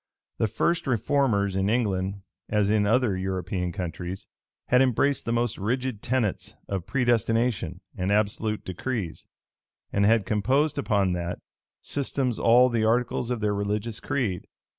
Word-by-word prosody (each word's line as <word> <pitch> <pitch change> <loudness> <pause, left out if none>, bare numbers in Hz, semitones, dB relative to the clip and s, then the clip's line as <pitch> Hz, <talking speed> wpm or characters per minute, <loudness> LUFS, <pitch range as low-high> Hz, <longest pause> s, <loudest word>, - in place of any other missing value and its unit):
The 110 - +3
first 170 - 0
reformers 115 -5 +1
in 95 +1 +1
England, 100 -4 0 0.3
as 105 -1 +2
in 105 -1 +3
other 115 -2 +2
European 95 -1 -2
countries, 90 +1 -5 0.4
had 125 +1 +5
embraced 135 +2 +2
the 115 - -1
most 120 -2 0
rigid 125 +2 -2
tenets 120 -5 -1
of 95 -2 -3
predestination 115 -6 +1
and 95 +1 -1
absolute 105 +1 0
decrees, 95 -1 -4 0.7
and 100 - +2
had 110 -1 +4
composed 135 +9 +1
upon 100 -8 +1
that, 90 0 -3 0.5
system 135 -2 -1
all 120 +2 +6
the 115 -2 0
articles 120 +1 +1
of 120 -3 -2
their 105 -1 +1
religious 105 +2 -2
creed. 120 -11 -2
105 Hz, 140 wpm, -26 LUFS, 95-125 Hz, 0.7 s, all